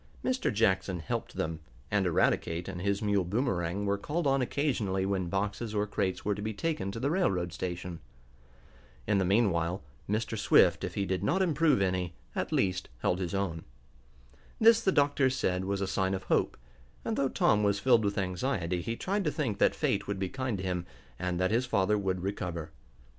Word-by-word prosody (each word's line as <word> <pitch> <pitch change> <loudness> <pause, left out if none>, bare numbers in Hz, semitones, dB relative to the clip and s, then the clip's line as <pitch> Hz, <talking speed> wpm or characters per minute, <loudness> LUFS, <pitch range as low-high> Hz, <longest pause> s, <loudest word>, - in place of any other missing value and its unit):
Mr. 255 0 +1
Jackson 95 -4 +1
helped 80 - -4
them, 80 0 -2 0.3
and 100 -2 +2
Eradicate 85 0 +1
and 95 -2 -5
his 100 +2 0
mule 100 -2 +2
Boomerang 100 -2 -1
were 100 0 0
called 155 +9 -2
on 135 -1 +3
occasionally 120 -9 0
when 95 -2 -1
boxes 105 +3 -2
or 105 0 +1
crates 95 -2 -2
were 105 - +2
to 100 - -6
be 110 0 -3
taken 150 -7 -2
to 115 - -6
the 140 +5 0
railroad 90 - +1
station. 90 -1 -4 1.1
In 100 - +2
the 95 - +2
meanwhile, 90 -4 +1 0.3
Mr. 110 +2 -1
Swift, 105 - +4
if - - -4
he 100 - 0
did 95 -1 -1
not 190 +2 +2
improve 155 - +3
any, 90 -2 -1 0.2
at - - -2
least 95 -1 0
held 90 - +1
his 95 +1 -2
own. 90 -5 -2 1.0
This 230 +1 +6
the 190 - +2
doctors 140 -4 +3
said 90 -4 0
was 100 0 -1
a 100 - 0
sign 95 0 0
of 95 - -5
hope, - - +1 0.5
and, 225 - -1
though 135 -7 +1
Tom 105 - +3
was 100 -1 +2
filled 120 -1 +4
with 100 0 -1
anxiety, 90 -2 -1
he 115 +6 -3
tried 200 - -1
to 150 - +2
think 120 -11 -2
that - - +4
fate 100 0 0
would 100 -1 -2
be 95 -1 -2
kind 130 -3 -2
to 90 - -5
him, 90 -1 -2 0.3
and 90 -1 -1
that 95 +1 +1
his 120 +3 +1
father 105 -3 +2
would 95 -2 -1
recover. 85 -5 -4
100 Hz, 195 wpm, -30 LUFS, 90-120 Hz, 1.1 s, This